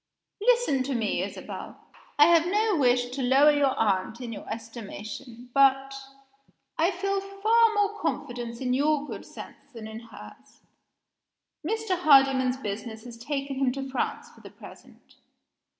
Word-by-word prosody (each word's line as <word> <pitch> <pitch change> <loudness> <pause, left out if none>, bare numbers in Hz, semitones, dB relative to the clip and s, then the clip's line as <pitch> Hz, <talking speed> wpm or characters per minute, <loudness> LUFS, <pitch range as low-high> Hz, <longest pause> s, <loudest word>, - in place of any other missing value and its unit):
"Listen 475 - +3
to 265 +1 -2
me, 225 -3 -1
Isabel! - - -7 0.4
I 295 - +8
have 335 0 +4
no 420 +2 +1
wish 245 -4 +2
to 270 +2 -4
lower 270 +4 +5
your 280 -2 +1
aunt 205 +1 0
in 240 -2 -6
your 205 - -9
estimation, 230 +2 -8
but 270 0 +4 0.8
I 330 +2 +2
feel 395 +1 -2
far 435 +4 +2
more 415 0 0
confidence 240 -1 -4
in 250 -1 -1
your 295 +2 +1
good - - -8
sense 280 - -12
than 230 -4 -9
in 220 0 -8
hers. 230 -1 -14 1.0
Mr. 415 0 -1
Hardyman's 270 -5 +4
business 220 -1 -6
has 240 -1 -10
taken 275 +2 -4
him 265 -2 +1
to 270 0 -6
France 260 - -3
for - - -19
the - - -11
present. - - -16
270 Hz, 150 wpm, -26 LUFS, 240-330 Hz, 1.0 s, I